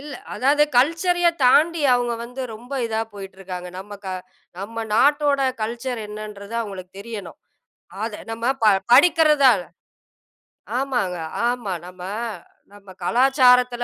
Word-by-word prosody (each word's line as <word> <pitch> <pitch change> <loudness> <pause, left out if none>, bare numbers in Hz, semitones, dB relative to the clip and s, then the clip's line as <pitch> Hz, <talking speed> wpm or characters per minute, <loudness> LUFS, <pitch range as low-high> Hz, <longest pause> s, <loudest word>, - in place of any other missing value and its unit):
இல்ல 290 0 -8 0.2
அதாவது 285 +3 +3 0.2
கல்ச்சரயே 340 +5 +3
தாண்டி 310 +5 +4
அவங்க 245 -1 +1
வந்து 250 +2 -8
ரொம்ப 240 +5 -12
இதா 220 -1 -2
போயிட்டு 195 -1 -9
இருக்காங்க. 180 -1 -7
நம்ம 205 +2 -9
க - - -3 0.5
நம்ம 225 +3 -5
நாட்டோட 285 +3 +3 0.2
கல்ச்சர் 235 +2 -3
என்னன்றது 210 0 -8
அவங்களுக்கு 190 -4 -9
தெரியணும். 205 -5 -8 0.7
அது 220 -2 -5
நம்ம 225 +1 -6 0.2
ப 220 - +4 0.3
படிக்கிறது. 300 -2 +6 1.3
ஆமாங்க, 245 -10 -1 0.3
ஆமா 240 -6 -2
நம்ம 180 0 -13 0.7
நம்ம 205 -1 -16
கலாச்சாரத்துல 250 +1 +4
240 Hz, 115 wpm, -22 LUFS, 205-275 Hz, 1.3 s, படிக்கிறது